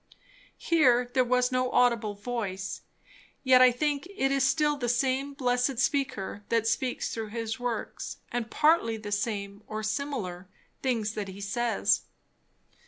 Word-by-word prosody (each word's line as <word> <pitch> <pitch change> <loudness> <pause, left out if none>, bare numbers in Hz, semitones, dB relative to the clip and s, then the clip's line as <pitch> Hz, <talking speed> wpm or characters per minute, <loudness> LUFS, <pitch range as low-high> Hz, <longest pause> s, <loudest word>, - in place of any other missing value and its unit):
Here 250 -7 +3
there 255 -1 +4
was 250 +1 +2
no 255 0 +1
audible 230 -4 +2
voice; 200 -3 -4 0.6
yet 260 -1 +6
I 255 -1 +8
think 290 +4 -1
it 275 -9 -1
is 275 -1 +2
still 295 +2 +2
the 245 -4 -2
same 265 +3 0
blessed 250 -1 +1
Speaker 260 -7 -1
that 230 -1 +2
speaks 245 +2 -1
through 225 -1 -4
his 225 +2 -4
works, 245 -2 -4
and 240 -2 -2
partly 295 -6 +3
the 210 -1 -7
same, 205 -1 -2
or 215 0 -4
similar, 215 -6 -3 0.3
things 225 -5 0
that 210 -2 -4
he 190 +1 -9
says. 230 +3 +1
245 Hz, 145 wpm, -28 LUFS, 215-265 Hz, 0.6 s, I